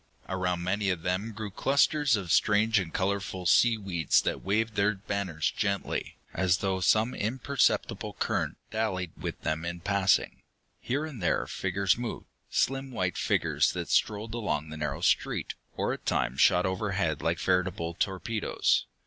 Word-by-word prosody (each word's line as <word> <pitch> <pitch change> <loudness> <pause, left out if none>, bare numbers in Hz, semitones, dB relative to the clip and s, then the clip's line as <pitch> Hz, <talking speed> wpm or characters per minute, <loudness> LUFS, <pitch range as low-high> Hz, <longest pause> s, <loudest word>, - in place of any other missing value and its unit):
Around 90 -2 -1
many 100 +3 0
of 90 -3 -2
them 95 +5 -1
grew 105 -1 -6
clusters 140 +3 +3
of 95 -5 -3
strange 105 +3 +4
and 85 -4 -4
colorful 95 -1 -2
seaweeds 95 - +3
that - - -2
waved 110 +3 0
their 105 +1 +2
banners 95 -5 -2
gently, 100 -2 -2 0.2
as 95 0 +2
though 95 -1 -1
some 110 +6 +3
imperceptible 130 +5 0
current - - -1
dallied 95 -6 -1
with - - -5
them 80 +1 -2
in 85 0 -4
passing. 100 +1 +1 0.4
Here 140 +5 -2
and 140 -9 -8
there 85 - +1
figures 95 +3 0
moved, 120 -1 -4 0.2
slim 135 0 0
white 95 -7 -2
figures - - +1
that - - -4
strolled 110 +1 +1
along 80 -10 -2
the 80 - -7
narrow 75 -2 -3
street, - - +1 0.2
or - - 0
at - - -8
times 65 +3 +1
shot 90 - +5
overhead 95 -5 -1
like - - 0
veritable 90 -2 0
torpedoes. 105 +5 0
100 Hz, 150 wpm, -28 LUFS, 90-110 Hz, 0.4 s, shot